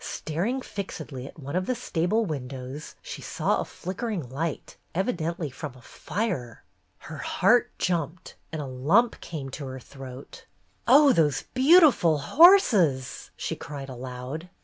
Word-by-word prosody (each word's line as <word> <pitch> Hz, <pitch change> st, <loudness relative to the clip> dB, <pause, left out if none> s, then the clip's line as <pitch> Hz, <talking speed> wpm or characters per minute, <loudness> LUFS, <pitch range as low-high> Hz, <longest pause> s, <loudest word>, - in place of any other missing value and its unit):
Staring 200 Hz, -, -2 dB
fixedly 155 Hz, -9 st, -6 dB
at -, -, -13 dB
one 140 Hz, +1 st, -6 dB
of 185 Hz, 0 st, 0 dB
the 255 Hz, -, 0 dB
stable 215 Hz, 0 st, 0 dB
windows, 135 Hz, -2 st, -6 dB
she -, -, -7 dB
saw -, -, 0 dB
a -, -, -4 dB
flickering 190 Hz, -, -4 dB
light, 155 Hz, +2 st, -4 dB, 0.2 s
evidently 170 Hz, -, -1 dB
from 140 Hz, 0 st, -7 dB
a 130 Hz, -, -15 dB
fire. 175 Hz, -, -4 dB, 0.3 s
Her -, -, -9 dB
heart -, -, +3 dB
jumped, 170 Hz, -1 st, -2 dB, 0.2 s
and 155 Hz, -2 st, -4 dB
a -, -, -6 dB
lump 150 Hz, -, +2 dB
came 140 Hz, -5 st, -6 dB
to 140 Hz, 0 st, -6 dB
her 130 Hz, 0 st, -6 dB
throat. 130 Hz, 0 st, -11 dB, 0.4 s
''Oh, 275 Hz, +2 st, +7 dB
those 150 Hz, -, +2 dB
beautiful 265 Hz, -, +6 dB
horses!'' 180 Hz, -, +4 dB
she -, -, -3 dB
cried 140 Hz, -2 st, -8 dB
aloud. 130 Hz, +6 st, -7 dB
160 Hz, 140 wpm, -26 LUFS, 135-200 Hz, 0.4 s, Oh